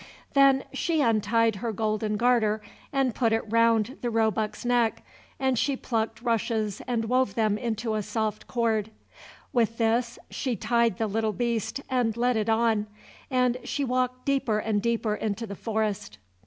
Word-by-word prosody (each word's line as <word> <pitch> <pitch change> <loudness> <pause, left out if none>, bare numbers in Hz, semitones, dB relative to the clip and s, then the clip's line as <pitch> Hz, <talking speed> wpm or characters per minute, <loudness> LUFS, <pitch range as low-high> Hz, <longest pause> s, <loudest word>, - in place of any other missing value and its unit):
Then 275 -1 +5
she 330 -2 0
untied 225 -2 +2
her 230 +3 -2
golden 215 0 -1
garter 225 -2 +2 0.3
and 270 -3 +1
put 230 -1 +1
it 225 - +1
round 230 +2 +2
the 240 - -1
roebuck's 220 -1 0
neck, 240 -2 +1 0.4
and 265 -3 +1
she 280 -2 +1
plucked 225 -1 -2
rushes 220 -3 -1
and 235 -2 0
wove 255 -3 +1
them 215 -2 +2
into 225 0 -2
a 215 - 0
soft 215 0 -3
cord. 225 -3 0 0.6
With 230 -2 +1
this 235 +1 +1
she 255 -3 -2
tied 235 -2 +1
the 225 - 0
little 215 +1 -1
beast 235 +3 -2
and 240 -4 0
led 245 +1 +2
it 220 0 0
on, 220 -2 +2 0.4
and 250 -2 +2
she 285 - -2
walked 255 0 -1
deeper 270 -6 +1
and 215 -1 0
deeper 230 -1 0
into 215 +2 -3
the 200 -2 -7
forest. 210 - -2
225 Hz, 160 wpm, -27 LUFS, 215-245 Hz, 0.6 s, Then